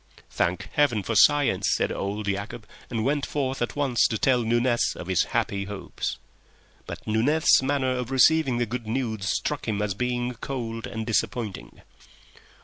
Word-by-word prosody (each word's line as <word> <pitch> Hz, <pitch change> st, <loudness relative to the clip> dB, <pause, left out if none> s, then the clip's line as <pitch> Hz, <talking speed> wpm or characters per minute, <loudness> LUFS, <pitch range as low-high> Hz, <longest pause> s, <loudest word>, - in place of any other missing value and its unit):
"Thank 90 Hz, +1 st, 0 dB
Heaven 125 Hz, -8 st, +2 dB
for 115 Hz, -, -2 dB
science!" 110 Hz, -6 st, +4 dB
said -, -, 0 dB
old 100 Hz, +1 st, -3 dB
Yacob, 100 Hz, +3 st, -3 dB, 0.3 s
and 115 Hz, -1 st, -2 dB
went 145 Hz, +1 st, +1 dB
forth 135 Hz, -3 st, -2 dB
at 120 Hz, -, -2 dB
once 140 Hz, -5 st, +2 dB
to 110 Hz, -, -2 dB
tell 125 Hz, +2 st, +3 dB
Nunez 120 Hz, +1 st, +1 dB
of -, -, -7 dB
his 95 Hz, -1 st, +1 dB
happy 100 Hz, -1 st, -1 dB
hopes. 100 Hz, -1 st, -5 dB, 0.7 s
But -, -, -8 dB
Nunez's 130 Hz, +10 st, +3 dB
manner 135 Hz, -1 st, 0 dB
of 125 Hz, -1 st, -2 dB
receiving 135 Hz, 0 st, +4 dB
the 120 Hz, -, +1 dB
good 120 Hz, 0 st, -5 dB
news 110 Hz, -5 st, -2 dB
struck -, -, -2 dB
him 105 Hz, -2 st, -1 dB
as 105 Hz, -1 st, -1 dB
being 125 Hz, +3 st, -2 dB
cold 115 Hz, -2 st, -5 dB
and 110 Hz, -1 st, -5 dB
disappointing. 115 Hz, -2 st, -3 dB
120 Hz, 160 wpm, -25 LUFS, 105-130 Hz, 0.7 s, science